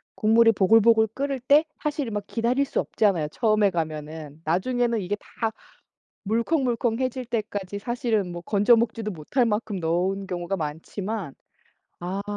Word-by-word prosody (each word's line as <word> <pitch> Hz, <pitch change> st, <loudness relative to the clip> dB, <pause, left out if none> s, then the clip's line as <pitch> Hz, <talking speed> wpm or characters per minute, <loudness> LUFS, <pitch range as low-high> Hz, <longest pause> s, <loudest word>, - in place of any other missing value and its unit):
국물이 225 Hz, +1 st, +5 dB
보글보글 220 Hz, +2 st, +5 dB
끓을 275 Hz, -1 st, -2 dB
때 285 Hz, +5 st, +5 dB, 0.2 s
사실은 290 Hz, -6 st, -2 dB
막 205 Hz, -1 st, -4 dB
기다릴 245 Hz, +4 st, +1 dB
수 -, -, -2 dB
없잖아요 180 Hz, -9 st, +1 dB
처음에 215 Hz, 0 st, +2 dB
가면은. 155 Hz, -2 st, -5 dB
나중에는 235 Hz, +7 st, +1 dB
이게 195 Hz, +3 st, -2 dB
다 225 Hz, +1 st, -4 dB, 0.7 s
물컹물컹해질 245 Hz, +1 st, 0 dB
때까지 205 Hz, -4 st, -3 dB
사실은 220 Hz, -5 st, -1 dB
뭐 175 Hz, 0 st, -6 dB
건져 210 Hz, +5 st, +4 dB
먹지도 225 Hz, -2 st, -1 dB
못할 190 Hz, -, 0 dB
만큼 210 Hz, -2 st, -1 dB
넣은 185 Hz, +4 st, -1 dB
경우가 180 Hz, +1 st, -3 dB
많지만. 170 Hz, +4 st, -4 dB, 0.7 s
아. 190 Hz, +3 st, -3 dB
215 Hz, 320 characters per minute, -25 LUFS, 180-235 Hz, 0.7 s, 국물이